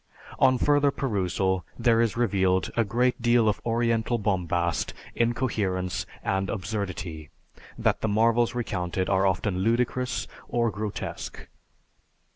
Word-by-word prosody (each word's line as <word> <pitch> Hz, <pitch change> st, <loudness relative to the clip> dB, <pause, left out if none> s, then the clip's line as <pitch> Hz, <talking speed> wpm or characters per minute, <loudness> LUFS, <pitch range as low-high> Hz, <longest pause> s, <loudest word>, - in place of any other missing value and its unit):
On 130 Hz, 0 st, +5 dB
further 145 Hz, +2 st, +3 dB
perusal, 95 Hz, -7 st, 0 dB
there 115 Hz, -1 st, +3 dB
is 115 Hz, -1 st, 0 dB
revealed, 95 Hz, -5 st, +1 dB
"A 115 Hz, -, +3 dB
great 120 Hz, +4 st, +1 dB
deal 120 Hz, -1 st, +4 dB
of 105 Hz, -, +1 dB
Oriental 115 Hz, 0 st, +1 dB
bombast, 90 Hz, -5 st, -1 dB, 0.2 s
incoherence 105 Hz, -7 st, -1 dB, 0.2 s
and 95 Hz, -1 st, 0 dB
absurdity, 90 Hz, -6 st, -4 dB, 0.5 s
that -, -, +1 dB
the -, -, 0 dB
marvels 115 Hz, +3 st, +2 dB
recounted 95 Hz, -5 st, -2 dB
are 95 Hz, 0 st, +3 dB
often 95 Hz, 0 st, 0 dB
ludicrous 125 Hz, +4 st, 0 dB, 0.2 s
or 115 Hz, -2 st, +1 dB
grotesque." 105 Hz, -1 st, -5 dB
110 Hz, 115 wpm, -26 LUFS, 95-120 Hz, 0.5 s, On